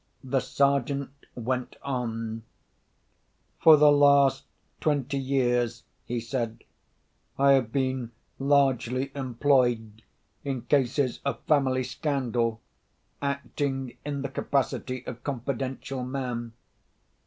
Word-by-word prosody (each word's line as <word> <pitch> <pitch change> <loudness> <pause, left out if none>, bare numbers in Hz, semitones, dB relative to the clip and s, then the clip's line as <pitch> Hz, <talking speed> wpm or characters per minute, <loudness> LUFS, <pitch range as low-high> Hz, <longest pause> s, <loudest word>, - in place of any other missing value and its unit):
The 130 +1 +1
Sergeant 140 0 +1 0.2
went 125 +1 -3
on: 115 -4 -3 1.2
"For 160 -2 +8
the 150 0 +7
last 140 -1 +5 0.3
twenty 140 -2 0
years," 125 -4 0 0.2
he 120 0 -1
said, 115 -1 -3 0.7
"I 140 0 +5
have 130 -5 +3
been 130 -3 -1 0.3
largely 135 -2 +2
employed 120 -4 +1 0.4
in 135 -4 -3
cases 130 0 +1
of 140 - -2
family 130 -4 +2
scandal, 120 -4 -1 0.6
acting 140 -2 -2
in 145 -1 -3
the 140 - -3
capacity 130 -2 -2
of 125 -1 -7
confidential 135 0 -3
man. 125 -3 -4
130 Hz, 95 wpm, -27 LUFS, 120-140 Hz, 1.2 s, For